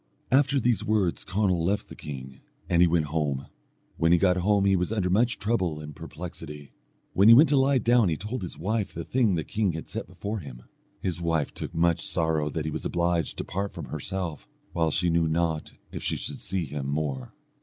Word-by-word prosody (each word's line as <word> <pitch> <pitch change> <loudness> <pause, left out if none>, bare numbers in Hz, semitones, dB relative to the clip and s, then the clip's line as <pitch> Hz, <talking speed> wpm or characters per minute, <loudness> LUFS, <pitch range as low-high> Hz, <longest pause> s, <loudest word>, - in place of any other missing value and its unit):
After 140 +1 +4
these 120 -2 +1
words 105 -5 +1
Conall 95 -3 +1
left 100 +4 0
the - - -10
king, 65 -2 -8 0.3
and 85 -1 +3
he 90 - +7
went 85 -2 +2
home: 70 -4 -1 0.5
when 80 +1 +3
he 85 - +6
got 90 0 +3
home 100 +2 +2
he 100 -1 +4
was 90 +2 0
under 95 -5 0
much 120 +5 +2
trouble 95 -8 0
and 75 -1 -8
perplexity. 75 -3 -8 0.4
When 100 +3 +5
he 115 - +10
went 150 +6 +7
to 145 - +3
lie 135 0 +4
down 120 -3 +4
he 80 - 0
told 110 +4 -4
his 90 - -5
wife 105 +4 -2
the 85 - -4
thing 115 -4 +2
the 80 - -1
king 105 -5 0
had 80 - -7
set - - -4
before 105 +2 -5
him. 65 -7 -10 0.4
His 90 -2 -2
wife 80 -4 0
took - - -6
much 85 0 +2
sorrow 80 -3 0
that 80 +1 -3
he 80 - -2
was - - -4
obliged 85 -1 0
to - - -2
part 100 +2 -3
from - - -7
herself, 90 -4 -4 0.3
while 80 -1 +2
she 85 +3 +1
knew 85 -1 +2
not 80 -1 -1 0.2
if - - -6
she - - 0
should - - -5
see 90 -2 0
him 70 -1 -5
more. 70 -4 -3
85 Hz, 215 wpm, -27 LUFS, 80-105 Hz, 0.5 s, he